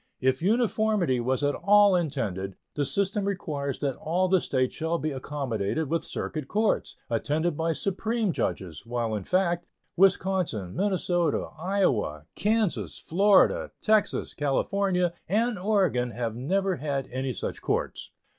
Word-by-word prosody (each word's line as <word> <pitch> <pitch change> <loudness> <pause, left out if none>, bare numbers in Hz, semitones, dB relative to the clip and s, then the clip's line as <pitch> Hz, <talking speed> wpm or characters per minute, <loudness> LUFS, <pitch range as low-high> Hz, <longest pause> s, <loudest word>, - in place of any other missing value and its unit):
If 130 +2 +1
uniformity 215 - +2
was 130 +3 0
at 145 0 +2
all 205 +1 +5
intended, 110 - -2 0.2
the 145 - 0
system 200 +8 0
requires 150 -9 -2
that 140 -3 -1
all 180 +4 0
the 185 -1 +3
States 130 -2 0
shall 160 +1 -1
be 155 -1 -2
accommodated 135 0 -2
with 165 - +1
circuit 155 -4 -4
courts, 215 +5 0
attended 150 +8 0
by 165 +2 0
Supreme 210 +2 -1
judges, 85 -6 -3
while, 115 -1 -2
in 105 -3 -3
fact, 175 -2 +1 0.3
Wisconsin, 180 - +1
Minnesota, 180 -4 0
Iowa, 135 - 0
Kansas, 215 -2 0
Florida, 205 - +3
Texas, 215 -2 +1
California, 180 +5 0 0.2
and 220 +2 +1
Oregon 185 - +1
have 115 -1 -3
never 190 +9 0
had 140 -1 -2
any 130 +1 -2
such - - -5
courts. - - -2
165 Hz, 135 wpm, -27 LUFS, 130-195 Hz, 0.3 s, all